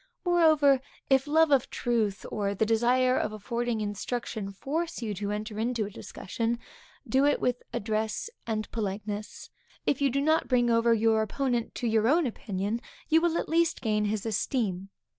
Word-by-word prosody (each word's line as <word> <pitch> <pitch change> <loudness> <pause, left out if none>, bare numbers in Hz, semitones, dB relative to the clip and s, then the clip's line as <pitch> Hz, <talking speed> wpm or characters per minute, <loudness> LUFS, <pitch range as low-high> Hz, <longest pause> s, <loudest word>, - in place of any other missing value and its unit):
Moreover, 310 -6 +5 0.3
if 270 +1 +4
love 320 +1 +4
of 270 -3 +3
truth 220 -5 -1
or 200 -1 -1
the 220 - +1
desire 245 +3 +3
of 215 - 0
affording 235 +2 -2
instruction 210 0 -3
force 310 - -3
you 215 -2 -2
to 200 +1 -4
enter 210 +1 -4
into 230 -1 0
a 205 - -7
discussion, 230 +4 -3 0.5
do 265 +1 +3
it 290 0 +3
with 250 0 0
address 220 - -2 0.2
and 215 -2 -2
politeness. 210 0 -4 0.3
If 280 - +1
you 280 - +4
do 275 +2 0
not 315 +3 +2
bring 245 -2 +3
over 230 0 +4
your 220 0 +3
opponent 240 +1 -1
to 245 - -2
your 220 0 +2
own 315 +5 +4
opinion, 210 -1 -3 0.3
you 320 +1 +5
will 340 -1 +1
at - - -2
least 330 0 +2
gain 210 -2 +1
his 210 0 -2
esteem. 210 -3 -1
230 Hz, 170 wpm, -28 LUFS, 215-270 Hz, 0.5 s, Moreover